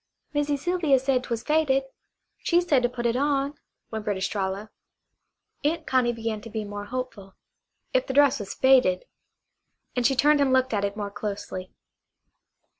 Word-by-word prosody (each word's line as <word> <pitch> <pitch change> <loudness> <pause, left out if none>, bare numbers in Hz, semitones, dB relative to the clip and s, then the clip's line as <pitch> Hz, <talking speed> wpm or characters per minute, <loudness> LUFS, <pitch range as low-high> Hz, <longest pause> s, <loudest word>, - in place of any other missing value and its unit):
"Missy 290 0 +1
Sylvia 320 -2 +2
said 260 -1 +1
'twas 235 -3 -3
faded. 300 -3 +2 0.6
She 345 - +3
said 305 -7 +3
to 245 - +2
put 240 -1 -5
it 235 0 +2
on," 280 +1 +1 0.4
whimpered 210 -3 -2
Estralla. 195 +2 -2 0.9
Aunt 315 +2 0
Connie 255 -2 +2
began 225 -2 -3
to 230 - -9
be 215 -1 -4
more 205 0 -6
hopeful. 220 -5 -6 0.6
If - - +2
the - - -2
dress 285 -2 +5
was 200 -2 -6
faded 255 -9 +4 0.9
and 250 - +1
she 265 +3 +3
turned 290 +2 +4
and 275 -2 +3
looked 260 -1 +2
at 205 -1 0
it 200 +1 -2
more 205 -1 -4
closely. 200 -3 -5
250 Hz, 160 wpm, -26 LUFS, 210-280 Hz, 0.9 s, dress